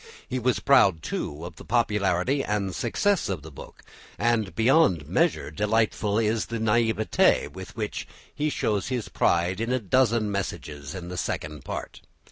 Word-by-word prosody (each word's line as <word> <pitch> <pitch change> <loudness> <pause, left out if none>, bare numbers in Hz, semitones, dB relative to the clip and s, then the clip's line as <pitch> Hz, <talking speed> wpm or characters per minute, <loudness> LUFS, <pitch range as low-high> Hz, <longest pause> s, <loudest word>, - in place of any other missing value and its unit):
He 130 - -2
was 125 0 +1
proud, 100 - +4
too, 75 +3 -4
of 85 -2 -9
the - - -10
popularity 110 +2 +1
and 100 -3 -1
success 190 - 0
of 90 -7 -3
the 80 - -10
book, 70 - -12 0.3
and 110 -7 0
beyond 115 - +3
measure - - +1
delightful 105 +2 +1
is 110 0 +1
the 115 - -3
naivete 110 -1 +2
with - - -10
which - - -4 0.3
he 150 +1 -1
shows 105 -8 -1
his 125 -3 -3
pride 90 +4 +1
in 115 +2 -1
a 130 - +2
dozen 115 -1 +2
passages 75 -6 -5
in 90 -1 -7
the 90 - -6
Second 75 -4 -4
Part. - - -6
105 Hz, 160 wpm, -26 LUFS, 90-120 Hz, 0.3 s, proud